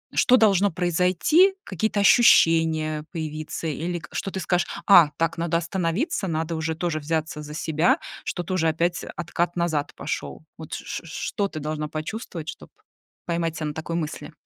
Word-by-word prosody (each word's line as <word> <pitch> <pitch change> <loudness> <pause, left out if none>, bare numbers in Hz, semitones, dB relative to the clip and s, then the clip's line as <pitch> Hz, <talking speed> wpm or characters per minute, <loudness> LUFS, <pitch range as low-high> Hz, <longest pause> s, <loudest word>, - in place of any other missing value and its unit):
что 255 - +5
должно 205 -3 +4
произойти, 180 - +3
какие-то 205 +2 -1
ощущения 160 -8 +4
появиться? 155 -1 -5
Или 170 +4 -2
к 150 - -12
что 195 - -3
ты 190 - -4
скажешь: 180 -1 0 0.2
"А, 175 -7 +8
так, 165 +1 0
надо 165 0 +1
остановиться, 185 - -1
надо 165 0 -2
уже 160 0 -2
тоже 165 -1 -2
взяться 155 0 -2
за 150 0 -8
себя" 160 +1 +2 0.3
что 175 - -3
тоже 170 -2 0
опять 170 +2 0
откат 175 +1 -2
назад 160 -4 -1
пошёл. - - -5
Вот 160 -2 -10
ч - - -5
ч - - -5
что 200 +4 -2
ты 155 -5 -7
должна 150 0 -3
почувствовать, 160 +1 -6
чтоб - - -9 0.6
поймать 170 -1 -1
себя 155 - -3
на 150 - -4
такой 160 +2 -5
мысли? 155 -3 -4
165 Hz, 165 wpm, -24 LUFS, 155-180 Hz, 0.6 s, А